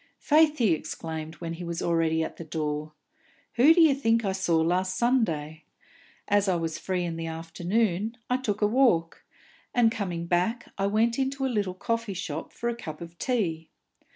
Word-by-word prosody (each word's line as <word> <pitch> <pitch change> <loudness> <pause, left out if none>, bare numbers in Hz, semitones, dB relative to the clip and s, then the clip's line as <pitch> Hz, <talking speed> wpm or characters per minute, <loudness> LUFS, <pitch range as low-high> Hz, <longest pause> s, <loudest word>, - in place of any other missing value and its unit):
"Faith," 305 0 +4
he 225 -7 +3
exclaimed, 160 0 -5
when 165 -1 -5
he 170 +2 -7
was 170 -1 -4
already 165 -1 +1
at - - -6
the - - -6
door, 155 -1 -3 0.6
"who 260 +7 +6
d'ye 325 -3 +6
think 230 -4 +1
I 195 - +1
saw 190 -3 +1
last 185 +3 +1
Sunday? 165 - 0 0.6
As 205 0 +3
I 185 - +2
was 165 -2 -3
free 185 -2 -2
in 170 -1 -3
the 165 0 -4
afternoon, 180 +6 -1
I 250 - +1
took 210 -5 -2
a - - +5
walk, 210 -9 +2 0.5
and, 235 -2 +5
coming 180 -7 -3
back, 185 +8 0
I 195 0 0
went 230 +4 +1
into 270 0 -1
a 260 - -1
little 200 -4 -1
coffee 230 +1 -2
shop 160 -3 -5
for 235 - -4
a 235 - 0
cup 155 -10 -8
of 170 0 -9
tea. 170 -11 -1
185 Hz, 180 wpm, -27 LUFS, 165-230 Hz, 0.6 s, who